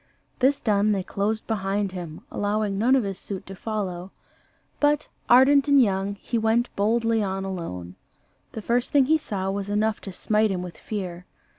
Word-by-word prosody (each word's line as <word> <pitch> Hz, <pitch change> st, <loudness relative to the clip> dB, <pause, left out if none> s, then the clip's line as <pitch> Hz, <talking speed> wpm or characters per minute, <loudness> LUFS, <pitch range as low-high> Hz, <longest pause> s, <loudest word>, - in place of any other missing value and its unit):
This 270 Hz, +2 st, +3 dB
done, 210 Hz, -1 st, +2 dB
they 195 Hz, -2 st, -1 dB
closed 210 Hz, +4 st, -2 dB
behind 200 Hz, -2 st, -1 dB
him, 175 Hz, -4 st, -7 dB
allowing 205 Hz, 0 st, -1 dB
none 250 Hz, +5 st, +4 dB
of 260 Hz, -, +2 dB
his 195 Hz, -2 st, -4 dB
suite 195 Hz, -2 st, -6 dB
to 195 Hz, -, -9 dB
follow: 190 Hz, -4 st, -4 dB, 0.7 s
but, 295 Hz, 0 st, +2 dB, 0.2 s
ardent 270 Hz, +3 st, +6 dB
and 280 Hz, -1 st, +6 dB
young, 200 Hz, -3 st, +1 dB
he 230 Hz, +3 st, -3 dB
went 225 Hz, +2 st, +1 dB
boldly 225 Hz, +2 st, +2 dB
on 195 Hz, -1 st, -2 dB
alone. 90 Hz, -, -5 dB, 0.6 s
The 220 Hz, -, -6 dB
first 240 Hz, +3 st, 0 dB
thing 280 Hz, -2 st, +5 dB
he 315 Hz, +3 st, +3 dB
saw 195 Hz, -8 st, -3 dB
was 200 Hz, 0 st, -4 dB
enough 215 Hz, +1 st, 0 dB
to 195 Hz, -, -7 dB
smite 215 Hz, +3 st, +1 dB
him 180 Hz, -2 st, -2 dB
with 180 Hz, -2 st, -9 dB
fear. 180 Hz, -4 st, -5 dB
205 Hz, 175 wpm, -25 LUFS, 195-230 Hz, 0.7 s, ardent